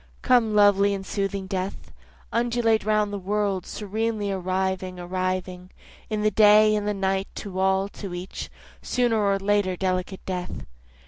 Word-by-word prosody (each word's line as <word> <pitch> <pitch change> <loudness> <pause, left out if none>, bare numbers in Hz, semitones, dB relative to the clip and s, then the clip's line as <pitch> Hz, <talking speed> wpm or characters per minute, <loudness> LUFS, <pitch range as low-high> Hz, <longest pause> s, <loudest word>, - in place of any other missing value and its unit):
Come 235 -4 +3
lovely 205 -1 +5
and 195 -1 -6
soothing 195 -1 -2
death, 190 0 -4 0.4
Undulate 235 -1 +1
round 210 -1 +1
the 200 - -3
world, 200 -1 -1
serenely 215 0 -2
arriving, 185 0 -2
arriving, 185 0 -3 0.4
In 215 -1 -1
the 215 - +3
day, 215 +1 +6
in 210 -1 0
the 210 - 0
night, 195 0 0
to 190 -3 -6
all, 190 +1 +2
to 200 -2 -8
each, 180 +2 -6 0.3
Sooner 240 -3 +1
or 200 -1 +2
later 195 -1 +1
delicate 185 0 -2
death. 180 -1 -5
200 Hz, 145 wpm, -25 LUFS, 185-210 Hz, 0.4 s, day